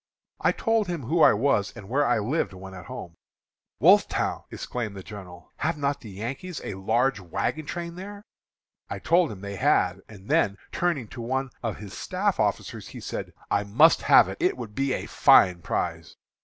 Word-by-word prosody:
I - - +3
told 225 -3 +1
him 170 -5 -3
who 160 +8 +1
I - - +8
was 105 -3 +1
and 100 -5 -10
where 140 +6 +1
I 120 - +3
lived 110 +2 -1
when 95 +1 -10
at 90 -3 -10
home. 85 - -8 0.7
'Wolfetown!' - - +3
exclaimed 110 -5 -5
the 95 - -8
general, 90 -4 -11
'have 160 +1 -1
not 140 -1 -1
the 110 - -10
Yankees 130 - -5
a - - -4
large 110 +5 +1
wagon 120 - -3
train 170 -1 -5
there?' 200 +3 -9 0.7
I - - -4
told 170 -4 +2
him 95 -3 -9
they 100 -1 -6
had; 90 +1 +2
and 100 -2 -13
then, 100 -1 +2
turning 170 -10 -1
to 120 - -8
one 130 +2 -2
of 115 -4 -3
his 100 -2 -9
staff - - -1
officers, - - -1
he - - -9
said, - - -5 0.2
'I 100 - +1
must 145 +12 +5
have - - +6
it; - - -6
it 360 +2 +2
would 105 -2 -7
be 135 +2 0
a - - -3
fine 90 -1 +5
prize.' - - -3
120 Hz, 190 wpm, -26 LUFS, 100-155 Hz, 0.7 s, I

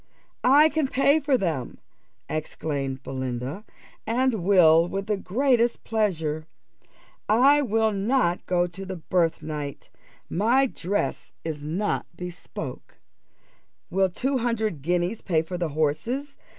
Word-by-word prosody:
"I 290 +5 +6
can 310 -2 0
pay 280 +3 +3
for 280 -3 +2
them," 160 - -2 0.5
exclaimed 140 -3 -3
Belinda, 130 - -4 0.4
"and 235 -4 +1
will 170 -3 +6
with 195 +2 -3
the 210 0 0
greatest 240 +4 +1
pleasure. 160 -8 -1 0.8
I 270 +7 +5
will 225 -4 +2
not 200 -2 +1
go 175 -1 +2
to 180 +2 -8
the 190 0 -5
birthnight 155 -4 -2 0.4
my 235 +9 +3
dress 205 -5 -3
is 155 -3 -4
not 180 +8 -1
bespoke. 180 -1 -8 0.9
Will 190 +1 +2
two 260 +8 -1
hundred 220 - -1
guineas 175 +6 0
pay 160 -4 +1
for 175 +2 -5
the 170 -2 -1
horses? 160 - -1
190 Hz, 120 wpm, -25 LUFS, 160-235 Hz, 0.9 s, I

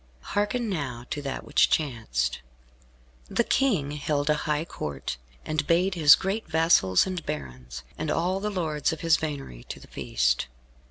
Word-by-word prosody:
Hearken 215 +4 0
now 135 - -3
to 145 - -2
that 135 -2 -4
which - - +4
chanced. 110 - 0 0.9
The 235 - +2
King 205 - +1
held 145 0 0
a 150 +1 -1
high 150 +2 +1
Court, 70 - -5 0.3
and 155 -2 -1
bade 180 +4 +3
his 150 -5 +8
great 195 +7 -3
vassals 160 - +4
and 185 -3 -4
barons, 65 - -6 0.2
and - - -2
all 180 +3 +1
the 210 +1 -2
lords 160 -5 -1
of 160 - -5
his 165 -1 +4
venery 140 - -5
to - - -7
the - - -14
feast. - - 0
150 Hz, 160 wpm, -27 LUFS, 120-175 Hz, 0.9 s, his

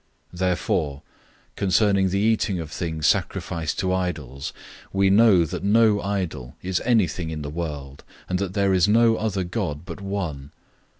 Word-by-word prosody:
008:004 90 - -10
Therefore 85 -5 0 0.5
concerning 100 0 +2
the 95 - 0
eating 105 -2 +1
of 80 -2 -6
things 80 -3 -3
sacrificed 80 +1 0
to 95 -1 0
idols, 75 -8 -3 0.4
we 95 0 +3
know 100 -5 +6
that - - -5
no 105 0 +4
idol 90 -10 -3
is 90 0 -1
anything 100 -8 +1
in 75 -2 -5
the 75 - -5
world, 75 -4 -6 0.2
and 90 0 -1
that 95 -2 -3
there 100 -1 +2
is 90 -1 +4
no 115 +2 +4
other 100 -4 -1
God 85 -5 -3
but 100 - -8
one. 90 -9 -4
90 Hz, 160 wpm, -24 LUFS, 80-100 Hz, 0.5 s, know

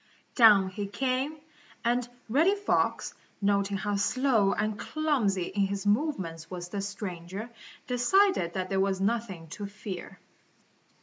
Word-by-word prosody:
Down 210 -6 +7
he 200 +2 -4
came, 265 +7 -1 0.5
and 240 +1 +1 0.2
Reddy 315 - +3
Fox, 405 0 0 0.3
noting 200 0 +1
how 205 +1 -1
slow 225 -1 +2
and 215 -1 -1
clumsy 260 - 0
in 195 +2 0
his 200 0 -4
movements 200 - -1
was 175 -1 -6
the 200 +1 -3
stranger, 200 +1 -6 0.3
decided 250 - +3
that 185 -1 -2
there 195 - +1
was 190 -1 +1
nothing 195 -5 -2
to 205 +6 -6
fear. 200 -3 -8
205 Hz, 130 wpm, -28 LUFS, 190-245 Hz, 0.5 s, Down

